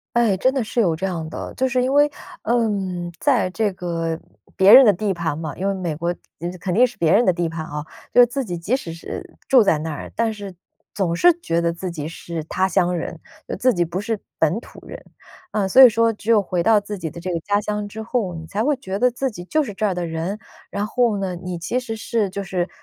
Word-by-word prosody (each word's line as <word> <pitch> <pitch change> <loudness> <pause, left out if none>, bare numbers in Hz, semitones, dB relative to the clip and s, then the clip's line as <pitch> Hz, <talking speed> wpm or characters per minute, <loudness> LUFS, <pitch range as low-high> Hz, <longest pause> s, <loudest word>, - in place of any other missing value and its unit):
哎， 230 -5 +3
真 260 +7 +2
的 265 -4 0
是 235 - -1
有 170 -7 +2
这 190 - -2
样 165 -4 -3
的。 - - -6
就 260 - +1
是 255 -1 +1
因 255 +2 0
为， 290 +1 +5 0.3
嗯 195 -7 -1
在 255 -10 +2
这 205 +1 0
个 165 -2 -3 0.4
别 190 +2 +7
人 270 - +11
的 210 - +6
地 200 +1 -1
盘 165 -4 -2
嘛， 160 -2 -5
因 195 +2 -1
为 195 - 0
美 175 -4 -3
国 170 +3 -2 0.5
肯 180 -2 -2
定 250 +4 +6
是 245 - -12
别 165 -1 +2
人 235 +4 +5
的 185 - +4
地 170 -1 -1
盘 160 -1 -5
哦。 150 0 -5 0.3
就 - - +6
是 245 - +8
自 265 +3 -3
己 180 -6 -4
即 195 +10 0
使 170 -11 -7
是 165 - -8
住 255 -4 +7
在 165 -6 +3
那 160 +1 -4
儿， 145 - -7
但 230 -1 +1
是 200 -3 -8 0.4
总 185 -5 0
是 350 - +6
觉 170 - 0
得 170 0 +1
自 180 +2 -5
己 155 -3 -5
是 170 0 -6
他 185 +4 0
乡 180 -1 +1
人， 165 0 -5 0.3
就 - - -4
自 250 +5 +2
己 175 -1 +2
不 170 +3 -4
是 220 +1 -2 0.2
本 160 +5 +2
土 - - -14
人。 - - -8 0.5
啊， 205 -3 0
所 260 +8 +8
以 255 - +11
说 230 0 +2
只 215 +1 -5
有 225 -2 +6
回 180 -2 -1
到 220 +1 +4
自 205 0 -6
己 160 -3 -4
的 170 - -9
这 185 +2 -4
个 170 - -1
家 205 +4 +1
乡 210 0 -3
之 220 +2 -7
后， 220 -6 -2
你 160 0 -7
才 210 +6 -2
会 295 +2 +3
觉 195 -6 -5
得 250 +2 +4
自 265 +2 -2
己 175 -6 -9
就 310 +11 +1
是 210 -8 -6
这 210 +2 0
儿 190 - 0
的 175 -1 -2
人。 165 +5 -3 0.3
然 205 +1 -2
后 235 -2 +1
呢， 185 -2 -3
你 180 0 -5
其 205 +9 -1
实 245 -3 -4
是 220 -1 -1
就 200 +2 -4
是 180 -1 -2
195 Hz, 275 characters per minute, -21 LUFS, 170-225 Hz, 0.5 s, 人